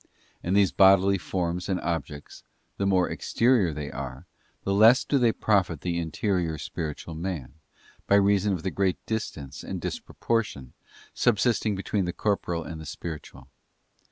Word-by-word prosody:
And 95 +3 +1
these 100 -3 +4
bodily 95 0 +5
forms 90 0 -3
and 95 -2 0
objects, 75 -3 -5 0.3
the 100 - 0
more 95 -2 +3
exterior 115 -7 +2
they 75 -1 -5
are, 65 +2 -7 0.4
the 100 - 0
less 110 +6 +6
do 140 - +2
they 120 -2 +4
profit 95 -9 +1
the 85 -1 -1
interior 85 0 -1
spiritual 80 +2 -5
man, 80 -5 -5 0.5
by 100 - +5
reason 100 0 +3
of 90 - -4
the 95 - -1
great 95 -2 0
distance 80 -11 -5
and - - -5
disproportion 105 - -3 0.4
subsisting 115 -2 +2
between 95 0 -1
the 90 - -3
corporeal 90 -5 -1
and 80 -1 -7
the 80 - -9
spiritual. 80 +3 -8
95 Hz, 150 wpm, -26 LUFS, 80-100 Hz, 0.5 s, less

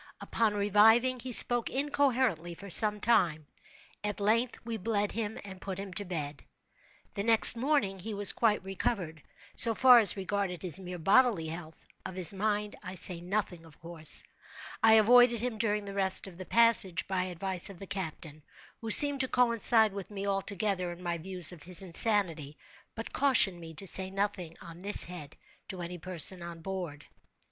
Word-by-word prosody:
Upon 220 -2 -2
reviving 225 +5 +2
he 250 +2 -8
spoke 240 0 +5
incoherently 260 - -2
for 200 +2 -9
some 210 +3 +5
time. 170 -9 0 0.6
At 210 0 -5
length 230 +4 -1
we 230 -1 -5
bled 205 0 -3
him 220 -1 -5
and 190 -2 -12
put 190 -2 -7
him 195 -1 -8
to 205 - -5
bed. 150 -6 -7 0.7
The 200 - -5
next 225 +2 +4
morning 235 -7 -2
he 210 +3 -7
was 200 -1 +7
quite 215 -4 -1
recovered, 190 -4 -5 0.3
so 230 -1 +7
far 250 0 +6
as 205 -3 +6
regarded 195 -3 -5
his 180 0 -1
mere 180 -1 -9
bodily 195 -1 +1
health. 160 -1 -11 0.2
Of 185 - -9
his 185 0 +1
mind 210 +1 -3
I 185 +1 -9
say 180 -1 -2
nothing, 180 -2 -5
of 160 -2 -20
course. 165 -1 +2 0.6
I 225 0 +4
avoided 235 +2 +4
him 235 -1 -5
during 210 -2 -2
the 200 - -9
rest 190 -1 +1
of 185 -2 -12
the 185 - -8
passage, 225 -7 +3
by 185 -1 -3
advice 185 +1 -2
of 195 - -12
the 195 - -11
captain, 160 -5 -8 0.4
who 225 - -8
seemed 285 +5 +6
to 260 - -1
coincide 230 -3 +1
with 200 -2 -9
me 200 -1 -7
altogether 195 -2 -3
in 175 +1 -12
my 170 -1 -4
views 180 0 0
of 175 -4 -14
his 180 +2 -2
insanity, 170 -6 0 0.4
but 225 - -9
cautioned 240 -10 +1
me 165 -1 -12
to 195 - -8
say 190 0 0
nothing 195 -4 -5
on 170 +1 -13
this 205 +2 +1
head 160 -4 -10 0.3
to 185 - -9
any 175 0 -8
person 180 +1 +2
on 170 -1 -10
board. 175 -5 -8
195 Hz, 180 wpm, -28 LUFS, 175-220 Hz, 0.7 s, was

